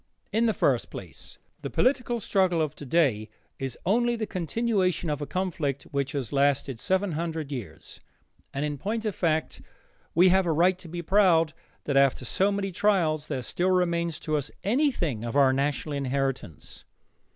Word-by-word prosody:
In 230 Hz, +2 st, +2 dB
the 220 Hz, -, +2 dB
first -, -, +1 dB
place, -, -, -9 dB, 0.2 s
the -, -, -4 dB
political 250 Hz, -2 st, +1 dB
struggle 185 Hz, -5 st, +1 dB
of 155 Hz, -3 st, 0 dB
today 130 Hz, -7 st, +1 dB, 0.3 s
is 135 Hz, -2 st, -3 dB
only 240 Hz, +5 st, +2 dB
the 225 Hz, -2 st, -2 dB
continuation 185 Hz, -2 st, 0 dB
of 145 Hz, 0 st, -3 dB
a 145 Hz, -, -3 dB
conflict 165 Hz, -7 st, -2 dB
which 140 Hz, +1 st, -1 dB
has 140 Hz, -3 st, -3 dB
lasted 140 Hz, -3 st, +1 dB
seven 190 Hz, +4 st, 0 dB
hundred 160 Hz, -2 st, -3 dB
years, 125 Hz, -6 st, -8 dB, 0.5 s
and 140 Hz, +2 st, -2 dB
in 145 Hz, -2 st, -4 dB
point 220 Hz, -, -3 dB
of 210 Hz, -, 0 dB
fact 160 Hz, -3 st, -1 dB, 0.5 s
we 180 Hz, +2 st, +6 dB
have 190 Hz, 0 st, +3 dB
a -, -, +2 dB
right 180 Hz, +4 st, +3 dB
to 185 Hz, -, -10 dB
be 170 Hz, +1 st, -5 dB
proud 170 Hz, -4 st, +4 dB, 0.3 s
that 140 Hz, -2 st, 0 dB
after 135 Hz, -2 st, +3 dB
so 195 Hz, +10 st, +1 dB
many 200 Hz, -1 st, -2 dB
trials 170 Hz, -6 st, +1 dB
there 130 Hz, -, -3 dB
still 180 Hz, +9 st, 0 dB
remains 170 Hz, -3 st, +1 dB
to 155 Hz, -, -1 dB
us 145 Hz, -1 st, -3 dB
anything 205 Hz, -, 0 dB
of 115 Hz, +1 st, -4 dB
our 135 Hz, -2 st, +5 dB
national 145 Hz, +2 st, -1 dB
inheritance. 135 Hz, -, -3 dB
165 Hz, 170 wpm, -27 LUFS, 140-190 Hz, 0.5 s, we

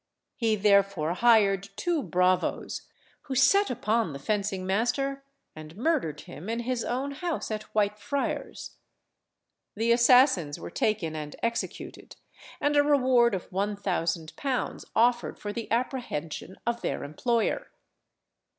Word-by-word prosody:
He 225 Hz, -3 st, +1 dB
therefore 200 Hz, -5 st, +3 dB
hired 200 Hz, -2 st, +3 dB
two 335 Hz, -, 0 dB
bravos, 180 Hz, -, 0 dB, 0.4 s
who 265 Hz, -, -3 dB
set 395 Hz, +10 st, +4 dB
upon 225 Hz, -, 0 dB
the -, -, -5 dB
fencing 195 Hz, +4 st, -2 dB
master, 270 Hz, +8 st, 0 dB, 0.3 s
and 155 Hz, +2 st, -11 dB
murdered 235 Hz, -, 0 dB
him 175 Hz, +8 st, -9 dB
in 230 Hz, +1 st, -1 dB
his 245 Hz, 0 st, -2 dB
own 265 Hz, +3 st, -2 dB
house 325 Hz, -2 st, -3 dB
at 215 Hz, 0 st, -5 dB
Whitefriars. 210 Hz, +6 st, -2 dB, 1.0 s
The 225 Hz, +2 st, +1 dB
assassins 235 Hz, -, +5 dB
were -, -, -8 dB
taken 190 Hz, -8 st, -1 dB
and 150 Hz, -1 st, -6 dB
executed, 230 Hz, 0 st, -4 dB, 0.4 s
and 290 Hz, 0 st, +1 dB
a 290 Hz, -, +7 dB
reward 255 Hz, -6 st, +4 dB
of 185 Hz, -, -7 dB
one 200 Hz, +3 st, -1 dB
thousand 170 Hz, -5 st, -2 dB
pounds 270 Hz, -3 st, -2 dB
offered 240 Hz, +1 st, +2 dB
for 205 Hz, 0 st, -5 dB
the 230 Hz, -2 st, -6 dB
apprehension 225 Hz, -, -3 dB
of 235 Hz, 0 st, -1 dB
their -, -, -2 dB
employer. 235 Hz, -, -1 dB
220 Hz, 130 wpm, -27 LUFS, 185-250 Hz, 1.0 s, a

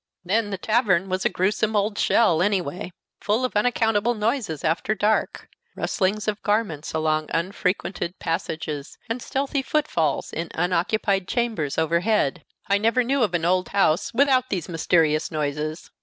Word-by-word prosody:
Then 205 Hz, +3 st, +1 dB
the 195 Hz, -, -3 dB
tavern 195 Hz, -3 st, +1 dB
was 185 Hz, +1 st, -1 dB
a -, -, +4 dB
grewsome 210 Hz, +3 st, 0 dB
old 205 Hz, +1 st, +1 dB
shell 175 Hz, -8 st, +3 dB
any 200 Hz, +1 st, +3 dB
way, 175 Hz, +2 st, -6 dB, 0.3 s
full 220 Hz, +5 st, +1 dB
of 255 Hz, -, -4 dB
unaccountable 225 Hz, 0 st, +2 dB
noises 215 Hz, -, -1 dB
after 170 Hz, +7 st, 0 dB
dark 215 Hz, +1 st, 0 dB, 0.3 s
rustlings 210 Hz, +1 st, -1 dB
of 210 Hz, 0 st, -1 dB
garments 205 Hz, -8 st, -1 dB
along 155 Hz, -1 st, 0 dB
unfrequented 180 Hz, 0 st, -2 dB
passages, 155 Hz, -3 st, -4 dB
and 235 Hz, +2 st, -3 dB
stealthy 275 Hz, +2 st, -1 dB
footfalls 220 Hz, -, -1 dB
in 165 Hz, +1 st, -3 dB
unoccupied 185 Hz, +3 st, 0 dB
chambers 220 Hz, -, -1 dB
overhead. 170 Hz, -1 st, +1 dB, 0.2 s
I 200 Hz, 0 st, +2 dB
never 230 Hz, +4 st, +2 dB
knew 270 Hz, +3 st, 0 dB
of 200 Hz, -6 st, +1 dB
an 165 Hz, -1 st, 0 dB
old 185 Hz, +1 st, +1 dB
house 195 Hz, -4 st, +2 dB
without 260 Hz, 0 st, +3 dB
these 180 Hz, -5 st, -2 dB
mysterious 165 Hz, -2 st, +2 dB
noises. 155 Hz, +1 st, -3 dB
195 Hz, 150 wpm, -24 LUFS, 165-220 Hz, 0.3 s, a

